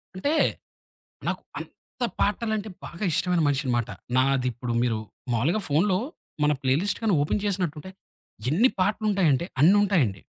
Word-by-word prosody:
అంటే 285 +12 0 0.9
నాకు - - -2 0.2
అంత 250 - -7 0.2
పాటలంటే 215 0 0 0.2
బాగా 175 +5 -6
ఇష్టమైన 175 +1 +1
మనిషిని 135 -2 0
మాట, 115 - -1 0.3
నాది 130 -1 +2
ఇప్పుడు 120 +1 -4
మీరు 115 -3 +1 0.3
మామూలుగా 150 - +1
ఫోన్‌లో 185 +6 +2 0.5
మన 150 - +4
ప్లే 130 - +2
లిస్ట్ 205 - -1
గాని 210 -5 +3
ఓపెన్ 150 +8 0
చేసినట్టుంటే 185 -4 -2 0.6
ఎన్ని 220 - +4
పాటలు 210 +3 +1
ఉంటాయి 190 -5 +3
అంటే, 135 - +1 0.2
అన్ని 185 +7 +7
ఉంటాయండి. 145 - +1
170 Hz, 145 wpm, -26 LUFS, 135-205 Hz, 0.9 s, అన్ని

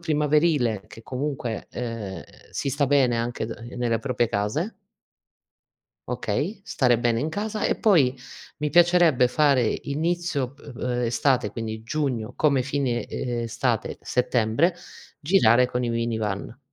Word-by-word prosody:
primaverile 150 - +2
che 115 - -12
comunque, 130 -3 -4
ehm, 115 -5 -5 0.3
si 140 - -3
sta 140 +1 +1
bene 130 -4 +3
anche 115 -1 -2
da 115 - -6
ehm, 120 +2 -9
nelle 115 -2 0
proprie 120 -2 0
case 115 - -1 1.3
okay, 205 0 -2
stare 120 - +2
bene 120 -1 +1
in 155 - -1
casa. 210 +5 -3
E - - 0
poi 145 - +4 0.4
mi 150 0 -1
piacerebbe 175 -7 +5
fare: 135 -4 +2
inizio 155 -3 -1
p 145 - -23
ehm, 125 -2 -5
estate 120 -1 +1
quindi 110 0 -5
Giugno, 125 -4 -2
come 140 -4 +2
fine, 130 -3 -1
ehm, 120 -1 -3
estate 115 - -1
Settembre, 125 +7 +1 0.5
girare 125 - +4
con 125 0 -1
i 120 - -1
minivan. 115 0 -2
125 Hz, 135 wpm, -25 LUFS, 115-150 Hz, 1.3 s, piacerebbe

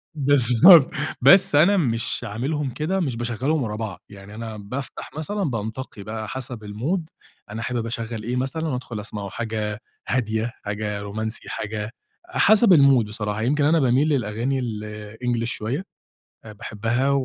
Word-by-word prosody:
بالضبط، 140 - +6 0.3
بس 145 +4 +7
أنا 175 +7 +5
مش 120 -6 0
عاملهم 135 +7 -2
كده، 165 +9 -1
مش 135 -9 -1
باشغّلهم 125 +5 -1
ورا 105 -2 -3
بعض، 105 -5 -5
يعني 100 +1 -12
أنا 110 -1 -6
بافتح 120 +6 -6
مثلًا 200 +6 -2
بانتقي 115 - -4
بقى 110 0 -5
حسب 125 -4 -5
الmood، 130 - -2 0.5
أنا 110 - -5
حابب 120 -1 -2
اشغّل 115 -1 -4
إيه 120 +2 -2
مثلًا، 145 +6 -2
وادخل 125 -5 -4
أسمعه، 105 -2 -6
حاجة 110 -1 -3 0.3
هادية، 110 -1 -1
حاجة 105 0 -3
رومانسي، 110 +2 -4
حاجة 105 +1 -4 0.3
حسب 215 - +5
الmood 140 -6 +5
بصراحة، 105 0 -3
يمكن 145 +5 +2
أنا 160 +2 +4
باميل 130 +3 +3
للأغاني 125 +1 0
الEnglish 110 +1 -4
شوية 120 - -3 0.6
آآ، 110 - -9
باحبها، 115 +5 -1
115 Hz, 145 wpm, -23 LUFS, 110-140 Hz, 0.6 s, بس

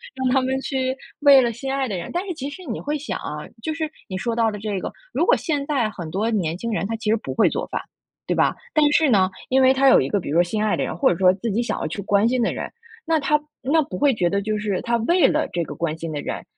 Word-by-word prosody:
让 260 -1 -1
他 265 - +4
们 265 +1 -1
去 265 -1 -2 0.2
为 285 -2 +8
了 240 -2 +1
心 265 +4 -5
爱 270 -1 0
的 200 - -3
人 170 - -6
但 355 +3 -2
是 360 - -2
其 280 -2 -5
实 370 +6 -10
你 230 - -4
会 295 +1 -2
想 295 - -5
啊， 150 0 -6
就 315 +4 -3
是 315 -2 -2 0.2
你 185 - -4
说 230 +3 -2
到 230 -1 +2
的 210 - -5
这 205 -2 -3
个。 - - -5 0.2
如 - - +1
果 - - +5
现 295 -4 -1
在 265 -7 +1
很 170 -5 -7
多 215 +7 -1
年 175 -5 -1
轻 230 +3 -4
人 200 -2 -1
他 225 - -2
其 220 -1 -1
实 - - +4
不 225 - -5
会 - - +4
做 - - -2
饭， - - -3 0.5
对 - - 0
吧？ - - +2 0.2
但 295 -1 +4
是 315 0 +4
呢， 190 -4 +4 0.2
因 265 +1 +4
为 260 0 +6
他 270 +1 +3
有 - - +7
一 130 - -2
个 205 - +1
比 170 - -6
如 160 - +1
说 - - +6
心 210 +4 -2
爱 215 - +2
的 - - -1
人， - - -4
或 265 - +3
者 170 - -1
说 185 -1 +6
自 205 +3 -3
己 230 +4 +1
想 240 - -2
要 - - -3
去 200 - -5
关 205 +2 +2
心 250 0 +1
的 - - +1
人。 - - -5 0.3
那 320 -1 +2
他 300 +1 +2 0.2
那 300 +4 +2
不 290 - -7
会 285 -1 +4
觉 175 -4 +1
得 200 0 +1
就 215 +1 -1
是 205 -3 -2
他 235 -1 0
为 340 +11 +3
了 305 +1 +1
这 170 -1 0
个 - - -7
关 160 -1 -2
心 165 0 -6
的 145 - -3
人， - - -5
235 Hz, 325 characters per minute, -22 LUFS, 200-275 Hz, 0.5 s, 为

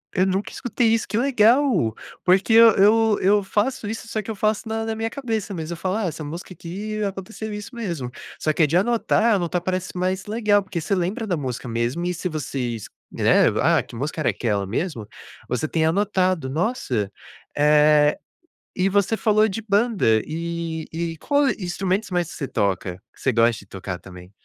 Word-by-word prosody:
Eu 185 -1 +3
nunca 190 +1 -1
escutei 245 -1 -1
isso, 230 - 0
que 215 - -2
legal! 240 - +3 0.3
Porque 190 +4 +3
eu 230 0 +9
eu 215 +2 +4
eu 200 +2 +4
faço 210 +3 -1
isso, 225 +2 -5
só 220 -1 -2
que 215 - -6
eu - - -5
faço 215 +2 0
na 225 0 -2
na 225 0 -2
minha 225 +1 -2
cabeça 225 -6 -3
mesmo, 165 -1 -4
eu - - -7
falo: 185 +3 -2
"Ah, 220 - -1
essa 160 -2 -4
música 170 +5 -7
aqui, 210 +5 -5
aconteceu 205 +2 -5
isso 210 +4 -7
mesmo", 170 - -4 0.3
só 155 - +1
que 165 - +2
é 150 - +4
de 165 +5 +2
anotar 225 +1 +2
anotar 175 -1 -1
parece 185 0 -3
mais 185 +1 -1
legal, 210 -2 +2
porque 190 -2 -4
você 180 +5 -1
lembra 195 +6 -2
da 180 - 0
música 130 -4 -4
mesmo 120 +9 -1
e 180 - 0
se 180 +1 -3
vocês, 125 - -4 0.2
né: - - +4
"Ah, - - +3
que - - -13
música 150 +6 -3
era - - +2
aquela 105 -4 -1
mesmo?". 115 - -3 0.4
Você 125 +5 -1
tem 160 0 +1
anotado, 185 -4 +1
nossa, 135 - -1 0.4
eh, 150 0 +5 0.6
e 185 +1 +2
você 200 +2 +1
falou 215 0 +3
de 210 +3 -4
banda 200 - +2
e 165 0 -4
e 165 0 -3
qual 285 - +2
instrumentos 190 +1 -2
mais 175 -2 0
que - - -9
você 140 - -4
toca, 95 -2 -1 0.2
que - - -23
você 135 - +2
gosta 115 0 +3
de - - -14
tocar 95 -1 -6
também? 90 -1 -13
185 Hz, 195 wpm, -23 LUFS, 150-215 Hz, 0.6 s, eu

